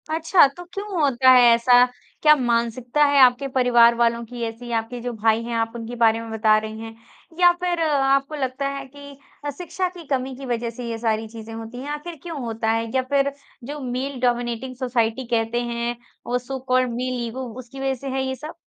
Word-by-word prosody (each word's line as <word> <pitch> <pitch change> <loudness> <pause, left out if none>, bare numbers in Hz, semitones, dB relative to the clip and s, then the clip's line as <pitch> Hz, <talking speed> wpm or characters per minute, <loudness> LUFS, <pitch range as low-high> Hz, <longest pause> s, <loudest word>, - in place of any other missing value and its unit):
अच्छा 325 +1 +5
तो 355 - -7
क्यों 400 -3 -4
होता 260 -3 +4
है 250 -1 +8
ऐसा? 245 +1 +5 0.4
क्या 300 0 +7
मानसिकता 240 +2 0
है 285 -1 +3
आपके 255 +2 +5
परिवार 240 -3 +4
वालों 235 0 +1
की 240 +1 -9
ऐसी? 235 +2 -8
आपके 230 +2 -2
जो 245 0 -4
भाई 220 +1 +1
हैं, 235 0 -4
आप 225 0 0
उनके 235 +1 -6
बारे 225 -1 +3
में 225 -1 -8
बता 215 -1 +3
रहे 215 0 -4
हैं 225 0 -8 0.4
या 355 -1 +7
फिर 350 -1 0
आपको 275 -1 +1
लगता 265 0 -2
है 275 0 -5
कि 285 0 -13 0.3
अ, - - -1
शिक्षा 360 +1 -3
की 350 -2 -12
कमी 260 -1 -1
की 270 +1 -9
वज़ह 235 -1 -2
से 245 -1 -6
ये 230 - -3
सारी 225 -1 -1
चीज़ें 225 0 -10
होती 225 +2 -8
हैं? 285 - -6
आखिर 300 +3 -5
क्यों 330 -4 -6
होता 225 -1 -1
है 225 0 -1
या 260 - +3
फिर 280 0 +3 0.3
जो 290 +4 -6
मेल 260 +1 -3
डोमिनेटिंग 245 +1 -1
सोसाइटी 245 -1 -1
कहते 225 +2 0
हैं 235 0 -2 0.3
और 245 +1 0
सो 265 +2 -6
कॉल्ड 255 -1 +3
मेल 250 0 -2
ईगो 255 +2 -5
उसकी 255 +2 -10
वज़ह 270 0 0
से 275 - -7
है 265 - 0
ये 265 - -2
सब? 305 +5 -8
245 Hz, 210 wpm, -23 LUFS, 230-275 Hz, 0.4 s, है